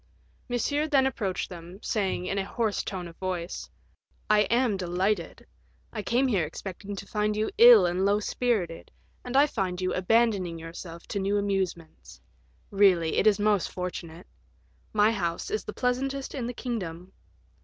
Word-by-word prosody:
Monsieur 285 +5 0
then 275 -3 +3
approached 200 -8 -2
them, 175 0 -10
saying, 195 -4 -1
in 195 +2 -1
a - - 0
hoarse 215 +1 -1
tone 180 -3 -5
of 165 - -12
voice, 185 -2 -4 0.6
"I 210 0 +4
am 235 -2 +2
delighted; 185 +1 -1 0.5
I 215 - -3
came 240 +6 +1
here 200 -9 +2
expecting 195 +5 -6
to 195 - -7
find 210 +1 -1
you 215 +1 0
ill 235 -5 +9
and 175 +2 0
low 200 +1 +3
spirited, 210 -7 -1 0.3
and 250 +2 -1
I 285 - +7
find 190 -10 -2
you 185 0 -1
abandoning 190 -3 +2
yourself 165 +1 -9
to 200 - -2
new 200 +1 +1
amusements; 190 -5 -3 0.5
really, 190 -5 +4
it - - +3
is 210 -2 +5
most 205 -3 +2
fortunate. 180 -1 -6 0.7
My 215 +1 +4
house 175 - -2
is 430 - -1
the - - -4
pleasantest 265 +2 -1
in 250 -4 -3
the 245 - -4
kingdom." 185 -8 -5
200 Hz, 160 wpm, -27 LUFS, 180-230 Hz, 0.7 s, ill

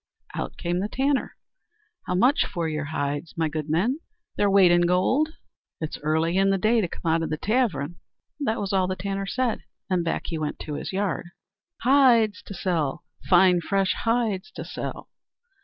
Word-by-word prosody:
Out - - -4
came 175 0 -1
the 205 +3 -2
tanner: 270 +2 0 0.7
"How 180 - 0
much 250 +10 +3
for 170 -2 -2
your 155 -1 -2
hides, 145 +1 -3
my 165 -1 +1
good 155 0 -4
men?" 215 - +1 0.4
"Their 205 - +2
weight 195 -3 +6
in 175 0 +5
gold." 250 - +2 0.5
"It's 155 -1 -4
early 160 +4 +1
in 195 0 +4
the 195 - +3
day 220 +4 +3
to 185 - 0
come 165 0 -3
out 165 +1 +2
of 165 - -2
the 155 - -2
tavern." 175 - 0 0.4
That 230 -6 -1
was 200 -1 -2
all 190 -1 +2
the 185 - -2
tanner 195 +1 -3
said, 245 +2 -1 0.3
and 180 -2 +2
back 165 - -1
he 165 - -3
went 150 -1 -3
to 150 - -5
his 145 - -4
yard. 195 -2 -2 0.6
"Hides 235 -6 +5
to 200 - -7
sell! 165 -7 -1 0.3
Fine 180 -1 +6
fresh 195 +2 +1
hides 230 -3 0
to - - -6
sell!" - - -6
185 Hz, 185 wpm, -25 LUFS, 165-215 Hz, 0.7 s, weight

